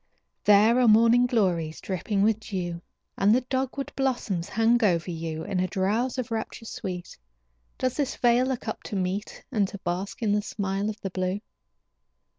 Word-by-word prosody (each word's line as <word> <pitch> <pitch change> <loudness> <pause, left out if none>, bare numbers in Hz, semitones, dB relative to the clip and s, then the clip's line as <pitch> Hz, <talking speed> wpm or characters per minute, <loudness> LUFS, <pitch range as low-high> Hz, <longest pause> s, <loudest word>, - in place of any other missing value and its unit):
There 210 +4 +6
are 250 - +4
morning 230 +3 +6
glories 175 -9 0
dripping 195 +2 -1
with 220 0 +3
dew, 175 -5 -4 0.4
And 205 +3 +5
the 255 - +2
dogwood 265 +2 -3
blossoms 225 -9 -1
hang 225 +3 +3
over 175 -3 +2
you. 160 -1 -4
In 190 -2 -2
a 185 - +1
drowse 215 +7 0
of 250 -3 -3
rapture 225 0 -4
sweet 180 -5 -6 0.6
Does 255 -1 -1
this 280 -2 -1
vale 245 +1 +3
look 255 -4 -3
up 220 - -3
to - - -5
meet, 190 +2 -3
And 210 -6 +2
to 200 - -8
bask 185 +6 -3
in 210 - +2
the 210 0 +2
smile 200 0 -2
of 215 0 -6
the 195 - -4
blue? 185 +2 -1
210 Hz, 175 wpm, -26 LUFS, 185-235 Hz, 0.6 s, There